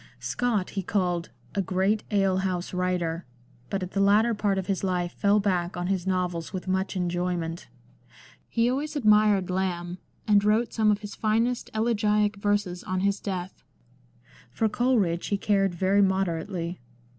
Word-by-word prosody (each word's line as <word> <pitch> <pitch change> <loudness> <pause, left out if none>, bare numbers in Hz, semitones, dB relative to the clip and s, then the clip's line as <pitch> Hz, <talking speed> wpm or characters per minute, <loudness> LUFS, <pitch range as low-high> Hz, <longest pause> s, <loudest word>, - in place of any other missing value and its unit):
Scott 230 -6 -1
he 195 - -2
called 180 -3 -1
" 120 - -29
a 200 - +1
great 190 +3 0
ale 195 -3 +2
house 185 -2 -2
writer," 180 -2 -1 0.5
but 195 -1 -2
at 180 - -6
the 195 - -2
latter 210 +4 +4
part 205 -2 0
of 190 - -2
his 195 0 -2
life 180 -2 0
fell 205 +3 +2
back 180 -4 -1
on 175 - -2
his 190 -1 -1
novels 180 -3 -1
with 185 -1 -5
much 190 +1 -1
enjoy 180 0 -1
ment. 165 0 -5 0.8
He 230 0 +2
always 285 +5 -2
admired 210 -6 +4
Lamb, 180 -1 -2 0.3
and 205 -1 +5
wrote 215 +3 +2
some 220 -2 +3
of 205 0 +2
his 205 -1 -7
finest 230 +3 0
elegiac 210 -2 +1
verses 205 -3 -1
on 185 0 -2
his 200 0 +1
death. 185 -2 -5 0.9
For 220 - 0
Coleridge 215 -8 +1
he 200 - 0
cared 195 -3 +1
very 190 +3 +3
moder 190 -4 +1
ately. 175 -3 -5
195 Hz, 170 wpm, -26 LUFS, 180-210 Hz, 0.9 s, and